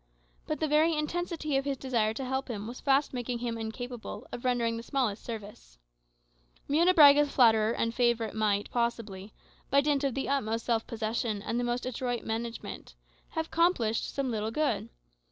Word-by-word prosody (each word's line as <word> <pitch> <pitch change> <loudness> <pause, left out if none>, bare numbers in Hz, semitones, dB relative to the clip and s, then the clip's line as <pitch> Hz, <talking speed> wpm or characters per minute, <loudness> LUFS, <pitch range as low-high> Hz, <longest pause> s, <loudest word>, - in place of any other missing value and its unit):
But 305 - -2
the 315 - +1
very 310 +2 +3
intensity 310 -1 -1
of 270 - -1
his 280 -1 -1
desire 235 -5 0
to 265 - -4
help 265 +1 -2
him 210 -3 -4
was 240 +3 -7
fast 275 +1 +2
making 245 -1 -3
him 235 -1 -3
incapable 230 +2 -6
of 240 - -6
rendering 240 -2 +1
him - - -4
the 230 - -6
smallest 240 -5 -1
service. 205 - -8 0.9
Munebrãga's 295 -2 +6
flatterer 220 -3 +5
and 230 -1 -1
favourite 235 -3 +1
might 210 -2 0
possibly, 225 -4 -2 0.4
by 280 - +5
dint 290 -1 +1
of 275 -3 0
the 270 - -2
utmost 230 -5 -1
self 230 -2 0
possession 220 -2 -2
and 230 +2 -1
the - - 0
most 240 0 -1
adroit 245 -1 -2
management, 230 +1 -5 0.4
have 320 -1 -1
accomplished 325 -11 +1
some 275 -2 -2
little 215 -1 -1
good. 300 +6 -1
240 Hz, 170 wpm, -29 LUFS, 225-280 Hz, 0.9 s, Munebrãga's